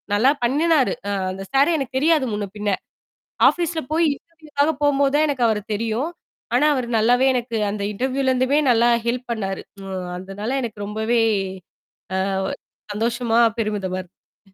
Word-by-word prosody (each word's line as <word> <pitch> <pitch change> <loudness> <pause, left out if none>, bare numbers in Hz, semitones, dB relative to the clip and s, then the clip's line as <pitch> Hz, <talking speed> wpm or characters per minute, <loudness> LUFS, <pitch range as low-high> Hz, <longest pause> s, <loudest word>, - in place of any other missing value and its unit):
நல்லா 255 +7 +5
பண்ணினாரு. 295 +2 +3 0.2
அ - - 0 0.2
அந்த 195 +1 -6
சாரே 280 +5 +4
எனக்கு 265 -1 -3
தெரியாது 310 -2 +3
முன்ன 205 0 -2
பின்ன. 210 0 -1 0.8
ஆஃபீஸ்ல 340 -2 -2
போய் 330 +2 +3
இன்டர்வியூக்காக 310 -2 -2
போம்போது 280 -1 +3
தான் 305 - +4
எனக்கு 265 -4 -1
அவர 220 -2 +1
தெரியும். 230 +8 -1 0.5
ஆனா 300 - +4
அவர் 255 -4 -2
நல்லாவே 245 +4 +4
எனக்கு 240 -2 -2
அந்த 205 -1 -4
இன்டர்வியூலேருந்துமே 260 +3 +1
நல்லா 235 +1 +4 0.2
ஹெல்ப் 245 +1 -2
பண்ணாரு. 195 -4 -3 0.2
ஒ - - -8 0.3
அதனால 205 +7 -4
எனக்கு 215 -4 -5
ரொம்பவே 220 +3 0 1.1
அ - - -1 0.6
சந்தோஷமா, 235 +1 +1 0.2
பெருமிதமா 195 -4 -2
இருந்தது. 190 +2 -24
245 Hz, 140 wpm, -22 LUFS, 215-280 Hz, 1.1 s, நல்லா